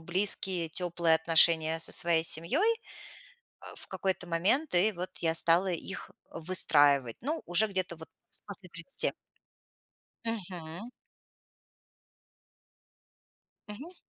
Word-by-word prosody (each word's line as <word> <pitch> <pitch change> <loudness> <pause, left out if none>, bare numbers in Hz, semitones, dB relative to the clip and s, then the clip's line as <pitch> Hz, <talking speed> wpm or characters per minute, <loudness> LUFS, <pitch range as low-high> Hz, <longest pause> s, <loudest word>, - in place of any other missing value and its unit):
близкие, 180 0 -1
тёплые 170 -1 0
отношения 160 0 +3
со 165 - +2
своей 170 -2 +3
семьёй 235 - +3 1.1
в - - -5
какой-то 190 -2 -3
момент. 190 - +1
И 205 +5 +5
вот 180 0 -5
я 165 -1 0
стала 170 +3 +3
их 180 +3 -6 0.2
выстраивать. 145 -7 +1
Ну, 305 +6 -4
уже 185 +5 +4
где-то 185 -4 -4
вот 160 - -12 0.4
после 195 -2 -5
30. 170 +10 0 1.1
Мгм. 185 -1 -7 2.8
Мгм. 280 - -10
175 Hz, 100 wpm, -29 LUFS, 165-195 Hz, 2.8 s, И